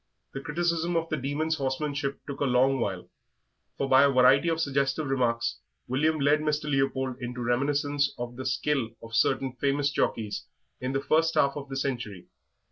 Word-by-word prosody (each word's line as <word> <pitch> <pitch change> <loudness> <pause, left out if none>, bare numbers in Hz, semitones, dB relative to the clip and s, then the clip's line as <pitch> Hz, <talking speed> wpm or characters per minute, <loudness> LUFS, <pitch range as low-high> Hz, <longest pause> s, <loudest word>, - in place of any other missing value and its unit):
The 135 - -5
criticism 170 +3 -1
of 165 0 0
the 155 - -1
Demon's 150 +4 -1
horsemanship 140 0 -2
took 140 -1 -6
a 145 - +1
long 130 +1 +3
while, 95 -5 -3 0.7
for 140 - -1
by 130 0 +6
a 140 - +6
variety 135 +4 +5
of 165 0 0
suggestive 140 0 0
remarks 120 -3 0 0.3
William 155 +5 +1
led 145 +2 +3
Mr. 150 0 -1
Leopold 135 -3 0
into 125 0 -5
reminiscences 140 +4 +1
of 120 0 -5
the 130 +1 -4
skill 130 -1 0
of 115 0 -10
certain 130 +2 +1
famous 140 +1 +1
jockeys 105 -7 -2 0.3
in 130 +1 -3
the 135 - 0
first 165 +2 +2
half 140 0 +3
of 140 -1 -7
the 135 - -4
century. 120 -9 -3
140 Hz, 175 wpm, -27 LUFS, 130-145 Hz, 0.7 s, by